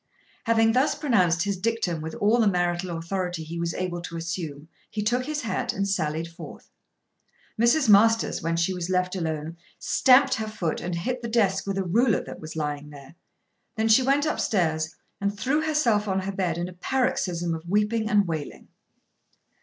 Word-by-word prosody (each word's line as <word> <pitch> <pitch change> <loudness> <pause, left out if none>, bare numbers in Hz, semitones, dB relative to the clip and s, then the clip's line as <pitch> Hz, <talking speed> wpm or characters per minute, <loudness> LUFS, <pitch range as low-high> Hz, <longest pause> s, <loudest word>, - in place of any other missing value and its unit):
Having 225 -1 +4
thus 260 +5 +2
pronounced 185 - +2
his 200 -1 -2
dictum 190 -5 -1
with 160 +1 -6
all 215 +4 +2
the 225 - +4
marital 175 -2 0
authority 175 0 -3
he 165 +2 -6
was 170 -1 -2
able 175 -2 -3
to 170 -1 -6
assume 165 -3 -5 0.2
he 210 - -3
took 245 +4 0
his 305 -1 -2
hat 225 - -2
and 195 +1 -1
sallied 160 -4 -1
forth. 170 +2 -12 0.9
Mrs. 250 +4 +4
Masters, 225 +2 +4
when 165 +1 -1
she 170 +3 +1
was 180 -1 -4
left 180 0 0
alone, 160 -1 -3 0.2
stamped 265 +1 +4
her 220 -2 -2
foot 180 -7 -3
and 175 0 -3
hit 245 +9 -3
the 235 - -4
desk 200 -4 +1
with 195 -1 -2
a 195 - 0
ruler 220 +5 +2
that - - -9
was 155 0 -8
lying 150 -1 -3
there. 140 -1 -13 0.6
Then 220 0 0
she 220 +4 +6
went 275 +3 +2
up 310 - -1
stairs 160 -5 0 0.3
and 200 +1 -1
threw 285 +6 +1
herself 255 -10 +1
on 190 -1 0
her 195 +1 -3
bed 185 -4 -1
in 175 +1 -2
a 180 - -9
paroxysm 180 -6 -1
of 165 +1 -7
weeping 210 +2 +1
and 205 -4 +3
wailing. 160 -3 -5
190 Hz, 185 wpm, -25 LUFS, 170-225 Hz, 0.9 s, she